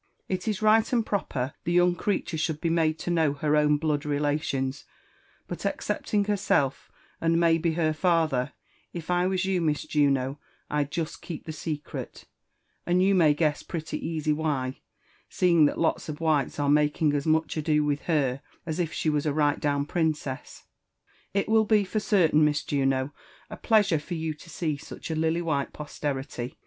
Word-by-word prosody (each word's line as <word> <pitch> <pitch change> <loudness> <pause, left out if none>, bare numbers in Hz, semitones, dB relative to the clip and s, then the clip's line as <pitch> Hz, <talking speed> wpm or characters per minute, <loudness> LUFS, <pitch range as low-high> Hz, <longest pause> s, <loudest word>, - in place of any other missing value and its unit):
It 185 +2 -3
is 215 -1 -1
right 220 +1 +4
and 235 -3 +2
proper 140 -11 -2
the 175 - -1
young 175 0 +4
creature 195 -1 -2
should 160 -1 -1
l>e 165 - 0
made, 160 -1 +2
to 175 - -3
know 160 -4 +2
her 150 +1 0
own 150 0 +4
blood 150 -1 -1
relations; 145 -2 -1 0.6
but - - -6
excepting 205 -2 -1
herself, 165 -9 0 0.3
and 165 0 +2
maybe 165 -1 +3
her 160 -1 +1
father, 155 -5 +1 0.4
if 170 0 -5
I 180 +1 +2
was 185 -1 0
you, 190 -2 +1
Mis 150 -3 0
Juno, 140 -2 +1 0.3
Pd 145 -1 0
jest 160 +1 -4
Jceep 165 -4 -7
the 160 - -6
secret, 155 -1 -6 0.6
and 180 +1 +2
you 195 +1 +4
may 160 -6 +4
guess 150 -1 +1
pretty 165 -2 -5
easy 155 -2 0
why, 145 -4 -2 0.5
seeing 170 -4 +4
that^lots 160 +1 -1
of 150 - -5
whites 155 -4 +1
are 145 - +1
making 150 +1 +3
as 145 +1 -1
much 160 0 +1
ado 150 -1 +1
with 145 -1 0
her 140 -5 +1 0.2
as 160 +1 -3
if 165 -2 0
she - - -3
was 150 0 +1
a 145 - +1
right 145 -1 +2
down 145 -1 0
princess. 155 -5 -2 0.7
It 200 0 0
will 220 0 +4
be 210 -1 +4
for 205 +3 -2
certain, 175 -8 +3
Mis 150 0 +2
Juno, 135 -1 0 0.4
a - - -5
pleasure 210 -8 +3
for 170 +4 -6
you 160 -1 -2
to 150 +2 -15
see 155 -4 -2
such 150 - -8
a - - -1
lily 160 +2 0
white 145 -4 -1
posterity. 135 -4 -5
155 Hz, 180 wpm, -27 LUFS, 145-170 Hz, 0.7 s, right